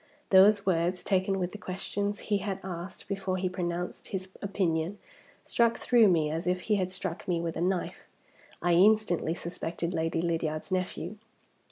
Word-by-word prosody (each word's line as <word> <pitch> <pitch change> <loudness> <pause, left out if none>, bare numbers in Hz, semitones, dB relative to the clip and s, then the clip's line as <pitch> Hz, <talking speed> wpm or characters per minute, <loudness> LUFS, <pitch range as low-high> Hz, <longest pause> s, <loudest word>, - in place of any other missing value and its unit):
Those 200 +1 +7
words, 180 0 +1
taken 195 0 +1
with 180 -1 -2
the 210 - -9
questions 200 +2 -3
he 205 -1 0
had 195 -1 -3
asked 180 0 -7
before 195 -2 -2
he 185 0 0
pronounced 180 -1 -3
his 190 -1 -4
opinion, 185 -2 -1 0.5
struck 235 -1 +2
through 235 -3 +5
me 160 -5 +3
as 165 +3 -3
if 180 0 +1
he 210 +2 +1
had 185 -2 0
struck 185 -2 -4
me 175 -2 +1
with 165 -1 -3
a - - -3
knife. 185 0 -1 0.6
I 175 - +3
instantly 185 -3 +4
suspected 170 0 -4
Lady 165 0 0
Lydiard's 160 0 -2
nephew. 185 +1 -2
185 Hz, 165 wpm, -29 LUFS, 170-195 Hz, 0.6 s, Those